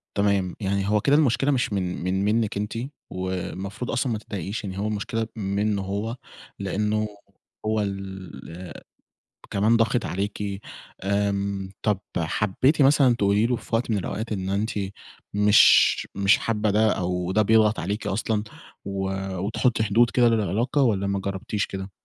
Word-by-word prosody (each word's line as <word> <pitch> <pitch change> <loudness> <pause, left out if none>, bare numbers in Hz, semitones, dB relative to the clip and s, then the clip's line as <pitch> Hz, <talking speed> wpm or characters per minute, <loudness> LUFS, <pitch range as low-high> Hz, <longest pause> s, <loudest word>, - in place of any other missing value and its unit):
تمام. 100 -3 +1
يعني 100 -1 -1
هو 105 -1 +3
كده 140 - +4
المشكلة 140 -1 +3
مش 125 -5 0
من 90 -3 -2
من 95 +2 0
منِّك 110 -1 +1
أنتِ 105 +1 -3 0.4
والمفروض 95 +4 -4
أصلًا 125 0 0
ما 110 - 0
تتضايقيش، 100 0 -5
يعني 95 -1 -5
هو 105 - -1
المشكلة 110 +1 -2
منّه 100 0 -1
هو، 100 +5 -3 0.4
لإنّه 105 +2 0 0.6
هو 110 0 +1
اللي 95 -3 -6 0.8
كمان 110 +4 +3
ضاغط 115 +1 +1
عليكِ. 100 +1 -3 0.4
آمم، 100 -1 -1
طَب 105 -3 +1 0.2
حبّيتِ 105 - +1
مثلًا 135 -3 +5
تقولي 100 +1 +2
له 125 0 +1
في 115 - -4
وقت 115 +1 0
من 105 - +2
الأوقات 110 +4 -4
إن 95 -2 -2
أنتِ 105 +3 0 0.6
مش 105 0 +6
مش 100 +1 +4
حابّة 110 -1 0
ده 110 +1 +3
أو 90 0 -1
ده 110 - +3
بيضغط 110 +1 +4
عليكِ 100 +5 -3
أصلًا 105 +1 0 0.4
و 95 -1 -2 0.3
وتحُطّي 110 +4 +1
حدود 115 +3 +4
كده 120 -2 +4
للعلاقة 115 - +1
والّا 100 -6 +2
ما 100 0 0
جرّبتيش 100 +2 -2
كده؟ 95 0 -6
105 Hz, 150 wpm, -25 LUFS, 95-110 Hz, 0.8 s, مش